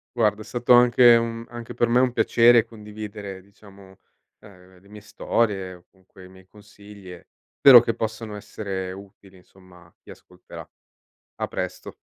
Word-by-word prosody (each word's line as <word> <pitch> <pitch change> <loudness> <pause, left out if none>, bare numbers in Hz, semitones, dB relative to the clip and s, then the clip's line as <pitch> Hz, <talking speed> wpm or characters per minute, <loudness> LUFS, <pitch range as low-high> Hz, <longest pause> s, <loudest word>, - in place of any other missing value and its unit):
Guarda 110 -3 0
è - - -8
stato 120 +2 0
anche 120 0 +5
un 115 0 -3
anche 120 -1 -10
per 120 - 0
me 120 +2 +2
un 130 -1 +1
piacere 120 0 +3
condividere, 105 -3 -10
diciamo, 100 -1 -19 0.4
ehm, 90 -3 -19
le 100 - -23
mie 105 0 -12
storie 105 -2 -3
o 90 - -21
comunque 95 0 -19
i - - -16
miei 95 0 -19
consigli, 100 -1 -16
e 90 - -16 0.3
spero 135 -3 +8
che 115 0 -3
possano 110 -1 -6
essere 95 -2 -7
utili, 95 0 -15
insomma, 90 -1 -21
a 85 - -26
chi - - -21
ascolterà. - - -14 0.7
A - - -2
presto. - - -7
105 Hz, 165 wpm, -22 LUFS, 95-115 Hz, 0.7 s, spero